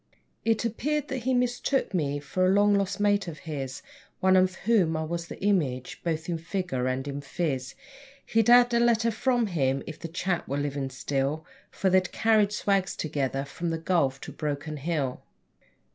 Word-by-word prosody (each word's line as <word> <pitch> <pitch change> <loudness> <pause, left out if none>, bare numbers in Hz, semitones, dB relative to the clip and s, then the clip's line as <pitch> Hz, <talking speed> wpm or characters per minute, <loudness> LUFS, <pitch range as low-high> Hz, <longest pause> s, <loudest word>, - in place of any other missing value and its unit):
It 225 0 +1
appeared 290 +6 -1
that 255 -3 -4
he 260 - +2
mistook 245 0 0
me 145 -5 0
for 150 +6 -2
a 185 - +4
long 205 +1 +4
lost 200 0 0
mate 205 -2 +2
of 160 -3 -6
his 135 -4 -5 0.4
One 190 0 +4
of 185 0 +3
whom 190 -9 +3
I 160 - -1
was 170 +1 -4
the - - -9
image, 145 -11 0
both 160 -1 -2
in 170 -2 -2
figure 165 -7 -2
and 130 +2 -2
in 140 0 -4
phiz 135 -3 -3 0.5
(He'd 225 -1 +2
have 245 0 +7
had 235 0 +3
a - - +5
letter 230 -1 +3
from 245 +1 +1
him 135 -8 0
if 155 - -8
the 165 - -5
chap 175 +1 -2
were 140 - -2
living 140 -1 -2
still, 140 +4 -2 0.2
For 190 -1 0
they'd 185 -1 +3
carried 215 -2 +3
swags 195 -2 0
together 135 -3 -2
from 165 +5 -4
the 165 - -1
Gulf 160 -5 +1
to - - -7
Broken 150 0 -4
Hill.) 145 -3 -2
170 Hz, 190 wpm, -27 LUFS, 145-205 Hz, 0.5 s, have